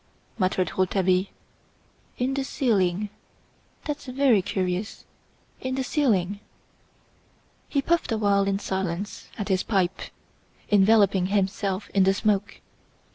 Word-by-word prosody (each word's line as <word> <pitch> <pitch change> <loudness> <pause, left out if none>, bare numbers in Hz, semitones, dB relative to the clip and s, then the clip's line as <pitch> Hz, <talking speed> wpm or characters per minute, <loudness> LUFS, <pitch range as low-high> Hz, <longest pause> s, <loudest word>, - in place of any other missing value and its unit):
muttered 185 -2 +1
Rouletabille. 185 0 +1 0.9
"In 255 +2 0
the 275 0 -1
ceiling! 205 -7 0 0.8
That's 295 -2 -4
very 255 -5 +3
curious! 185 +1 -3 0.5
In 260 0 -3
the 265 - -1
ceiling!" 205 - +1 1.3
He 280 -2 0
puffed 340 -4 +1
awhile 200 -3 +2
in 195 0 +1
silence 190 0 -4
at 205 -1 -4
his 185 -1 +2
pipe, 190 -4 0 0.7
enveloping 200 -2 +4
himself 195 0 -1
in 195 - +2
the 195 +1 +3
smoke. 205 -1 0
200 Hz, 110 wpm, -25 LUFS, 190-225 Hz, 1.3 s, enveloping